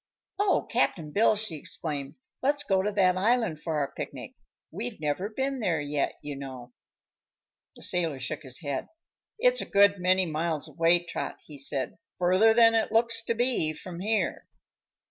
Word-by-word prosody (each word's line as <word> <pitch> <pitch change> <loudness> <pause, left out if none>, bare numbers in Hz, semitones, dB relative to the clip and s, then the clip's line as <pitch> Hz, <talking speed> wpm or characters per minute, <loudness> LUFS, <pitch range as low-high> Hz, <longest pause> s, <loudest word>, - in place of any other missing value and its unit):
"Oh, 405 -1 +2
Cap'n 155 -4 0
Bill!" 215 +5 +4
she 210 -6 -3
exclaimed, 145 -2 -4 0.3
"let's 285 +2 +1
go 190 -1 +2
to 210 +2 -1
that 185 -3 +3
island 215 -6 +1
for 160 -1 -2
our 140 -2 -1
picnic. - - -7 0.4
We've 125 - -5
never 155 +6 -1
been 265 +4 -2
there 180 -8 0
yet, 145 -1 -1
you 145 -1 -5
know." 130 -3 -8 1.0
The - - -10
sailor 165 -5 0
shook 130 +4 -4
his 130 +1 -5
head. 140 -4 -3 0.5
"It's - - +3
a - - -6
good 200 -1 +5
many 185 +1 +3
miles 160 -1 -2
away, 165 +3 +2
Trot," 175 - -5
he 145 -2 -11
said; 135 +2 -3 0.2
"further 185 +5 +4
than 225 0 +6
it 225 -1 +1
looks 230 0 +2
to 230 - 0
be, 235 -10 +1
from 175 +2 -9
here." 215 +3 -1
180 Hz, 165 wpm, -28 LUFS, 150-220 Hz, 1.0 s, than